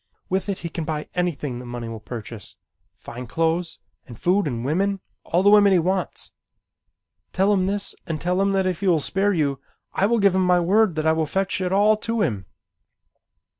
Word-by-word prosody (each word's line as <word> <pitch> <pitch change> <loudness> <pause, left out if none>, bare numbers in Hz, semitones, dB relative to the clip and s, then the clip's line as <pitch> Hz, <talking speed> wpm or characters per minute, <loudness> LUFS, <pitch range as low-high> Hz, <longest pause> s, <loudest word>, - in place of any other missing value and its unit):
With 190 +2 -1
it 195 - -1
he - - -2
can 165 - -4
buy 155 -1 -4
anything 150 -8 -2
that 125 - -9
money 120 -1 -6
will 115 -1 -6
purchase, 110 -2 -8 0.4
fine 125 +1 -9
clothes 165 +4 -1 0.3
and 120 -4 -11
food 185 +1 +2
and 120 -3 -3
women, 195 +7 0 0.2
all 175 +3 +1
the 205 - +6
women 205 -2 +6
he - - +5
wants. 185 +2 -2 1.0
Tell 195 +2 +3
him 185 -2 +1
this 200 +1 -1
and 160 -3 -3
tell 180 +3 0
him 195 0 +2
that 190 -1 +1
if 185 -2 -1
he 200 - -2
will 170 -3 +4
spare 195 +7 +1
you 145 -7 0 0.3
I 195 - +2
give 200 -3 +4
him 190 0 +2
my 180 -1 +4
word 195 +1 +3
that 155 0 -2
I 160 - +4
will 160 -1 0
fetch 190 +3 -1
it 180 -1 -1
all 210 +2 +4
to 230 0 -1
him." 100 - -2
180 Hz, 205 wpm, -23 LUFS, 150-195 Hz, 1.0 s, the